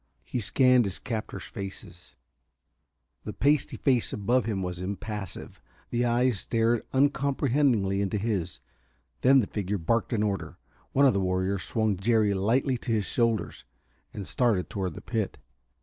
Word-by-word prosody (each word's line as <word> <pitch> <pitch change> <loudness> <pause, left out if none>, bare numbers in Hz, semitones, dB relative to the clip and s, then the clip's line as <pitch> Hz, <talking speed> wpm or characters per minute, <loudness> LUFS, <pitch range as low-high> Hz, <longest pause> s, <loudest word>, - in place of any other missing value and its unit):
He 125 - -3
scanned 125 +2 +4
his 95 -2 -2
captors' 110 -2 -5
faces. 95 -2 -9 1.1
The - - -5
pasty 145 +3 +1
face 130 -5 +1
above 120 +5 +1
him 100 -4 -2
was 90 -1 -4
impassive; 100 0 -5 0.3
the 120 0 +1
eyes 120 -2 +2
stared 115 +3 +1
uncomprehendingly 135 -7 +2
into 100 +1 -1
his. 100 -5 -2 0.6
Then 135 +1 +6
the - - -1
figure 100 0 -3
barked 110 +9 0
an 110 -3 +1
order. 100 -3 -3 0.4
One 140 +1 +5
of 130 - +5
the 100 - +1
warriors 95 +1 0
swung 110 -3 0
Jerry 105 +1 +2
lightly 120 +6 +1
to 120 - -4
his 110 -3 +1
shoulder, 115 -3 +1 0.6
and 100 - -6
started 110 -7 0
toward 95 -5 -3
the - - -8
pit. 110 -4 -3
110 Hz, 150 wpm, -27 LUFS, 95-125 Hz, 1.1 s, Then